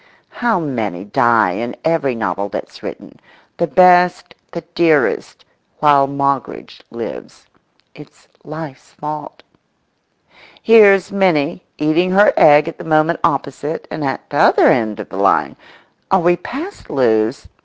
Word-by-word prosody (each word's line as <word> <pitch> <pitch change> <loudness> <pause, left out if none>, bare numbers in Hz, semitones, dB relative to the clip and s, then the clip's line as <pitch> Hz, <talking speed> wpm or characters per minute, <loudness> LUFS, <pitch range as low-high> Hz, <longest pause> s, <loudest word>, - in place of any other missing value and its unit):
How 235 -5 -1
many 110 - -4
die 110 -1 +2
in 120 +6 -5
every 150 -6 0
novel 100 -3 -3
that's - - -8
written—the 170 - -8
best, 180 -1 +3 0.2
the 170 - -6
dearest, 160 -6 0 0.3
while 145 -2 +3
Moggridge 140 -1 -3
lives. - - -9 0.5
It's - - -17 0.2
life's 155 -3 -10
fault. 150 0 -8 1.2
Here's 200 -4 +5
Minnie 180 -4 0
eating 155 +4 +1
her 200 +3 +4
egg 150 +1 +5
at 165 - -8
the - - -8
moment 160 +1 +1
opposite 140 +2 -3
and 155 - -5
at 135 -1 -4
t'other - - +4
end 110 -3 0
of - - -8
the - - -8
line—are 190 - -2
we 175 0 +2
past 285 - -9
Lewes? 115 -3 0
150 Hz, 120 wpm, -17 LUFS, 130-175 Hz, 1.2 s, Here's